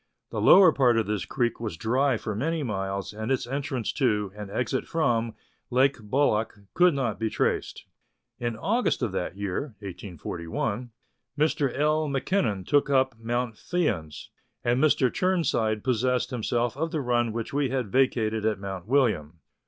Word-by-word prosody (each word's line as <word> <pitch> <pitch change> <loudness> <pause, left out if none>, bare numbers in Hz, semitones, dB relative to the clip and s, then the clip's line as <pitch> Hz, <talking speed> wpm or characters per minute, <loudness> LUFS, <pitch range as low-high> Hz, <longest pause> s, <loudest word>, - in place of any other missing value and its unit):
The - - -2
lower 185 -3 +8
part 125 -5 +3
of 115 - +2
this 105 -3 -2
creek 120 -3 -1
was 110 -8 -4
dry 125 - +1
for 110 - -4
many 155 +9 -1
miles, 100 -3 -3
and 110 +4 -4
its 130 - 0
entrance 135 -2 -2
to, 105 -8 +1
and 105 -1 -7
exit 125 +5 -2
from, 115 -8 0 0.3
Lake 130 +2 +3
Bolac 110 -1 0 0.2
could 180 -3 +4
not 120 -7 -1
be 110 -1 0
traced. - - -1 0.5
In 120 -2 -2
August 225 - 0
of 115 - 0
that 95 0 -3
year 100 +6 -3
(1841), 100 +3 -5 0.5
Mr. 145 -3 +1
L. 155 +1 +2
Mackinnon 135 - 0
took 145 0 +2
up 130 -2 +3
Mount 120 +1 -2
Fyans, 105 - -2 0.3
and 120 +4 +2
Mr. 135 -5 +3
Chirnside 125 - +1
possessed 125 +1 +1
himself 120 0 -1
of 160 +4 -2
the 160 -2 -2
run 120 -3 +1
which 115 +2 -5
we 140 -2 +1
had 125 -6 -2
vacated 110 -4 +1
at 110 -2 +1
Mount 95 -1 -6
William. 105 - +1
120 Hz, 160 wpm, -26 LUFS, 105-140 Hz, 0.5 s, lower